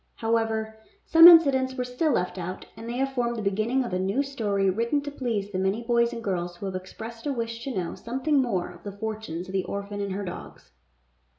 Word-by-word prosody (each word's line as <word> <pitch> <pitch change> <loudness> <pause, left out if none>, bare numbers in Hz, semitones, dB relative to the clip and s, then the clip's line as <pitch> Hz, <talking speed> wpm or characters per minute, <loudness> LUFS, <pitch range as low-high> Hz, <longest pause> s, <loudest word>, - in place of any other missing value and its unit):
However, 225 -1 -1 0.3
some 330 +1 +9
incidents 275 -6 +6
were 250 - -1
still 250 +6 0
left 180 -2 -1
out, 180 +1 -5
and 225 +1 -8
they 240 - -3
have 270 +1 -1
formed 240 -2 0
the - - -3
beginning 215 +7 +1
of 235 - -5
a 185 - 0
new 195 +9 +1
story 210 -8 -1
written 230 +9 +1
to 290 0 -6
please 225 -8 -3
the 185 - -2
many 195 +5 0
boys 235 0 +2
and 230 - -6
girls 175 -3 -2
who 185 - -7
have 190 - -3
expressed 225 +7 -7
a - - +1
wish 230 -2 -4
to 265 -7 -3
know 175 -2 -2
something 265 +5 0
more 190 -9 -1
of 175 -1 -14
the 200 +1 -8
fortunes 215 -5 -5
of 190 - -9
the 190 -1 +1
orphan 200 0 -5
and 200 -1 -3
her 200 +1 -4
dogs. 80 - -9
225 Hz, 225 wpm, -26 LUFS, 195-250 Hz, 0.3 s, some